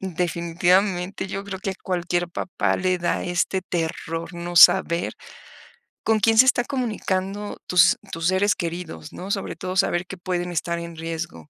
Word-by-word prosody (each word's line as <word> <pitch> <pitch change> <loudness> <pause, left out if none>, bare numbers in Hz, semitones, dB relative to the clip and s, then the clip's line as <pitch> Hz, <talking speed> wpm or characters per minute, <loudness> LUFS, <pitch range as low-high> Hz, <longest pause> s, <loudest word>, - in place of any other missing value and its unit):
definitivamente 180 +2 0
yo 195 +1 -5
creo 195 -1 -6
que 195 - -2
a 190 - -5
cualquier 175 -1 -1
papá 175 - -1
le 185 0 0
da 175 - -1
este 180 +2 0
terror 165 -1 -4
no 175 0 -6
saber 170 0 +6 0.9
con 220 -1 +2
quién 225 +2 +3
se 255 - +9
está 245 -2 +3
comunicando 205 -5 -3
tus 180 +6 +5
tus 165 +1 -2
seres 190 +2 +2
queridos, 170 0 -6
¿no? 190 +2 -6
Sobre 195 - -2
todo 185 0 -5
saber 175 0 +2
que 190 - -8
pueden 175 0 -3
estar 170 +1 -2
en 170 0 -7
riesgo. 165 -1 -6
180 Hz, 160 wpm, -23 LUFS, 170-195 Hz, 0.9 s, se